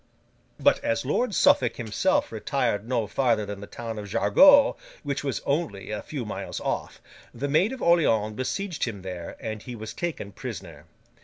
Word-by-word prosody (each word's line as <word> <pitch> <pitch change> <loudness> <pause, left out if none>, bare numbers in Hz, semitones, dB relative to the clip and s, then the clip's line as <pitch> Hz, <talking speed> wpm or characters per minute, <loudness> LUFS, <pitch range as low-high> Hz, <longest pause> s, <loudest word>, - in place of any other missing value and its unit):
But - - +3
as 115 +2 0
Lord 210 - 0
Suffolk 120 -3 +4
himself 110 -4 0
retired 105 +2 -1
no 120 -4 +1
farther 115 -1 +1
than 100 -1 -6
the 100 - -8
town 115 -1 -6
of 105 -1 -7
Jargeau, 280 - +6 0.3
which 140 -2 -2
was 135 -2 -2
only 130 - -2
a 105 - -3
few 140 -6 -5
miles 105 - -5
off, - - -3 0.4
the 135 +4 -2
Maid 165 - +3
of 265 - -6
Orleans 115 -11 +3
besieged 165 - -2
him 105 -6 -6
there, 90 -2 -6
and 110 -1 -5
he 125 +1 -7
was 110 0 -7
taken 155 -10 -4
prisoner. - - -8
115 Hz, 170 wpm, -26 LUFS, 105-145 Hz, 0.4 s, Jargeau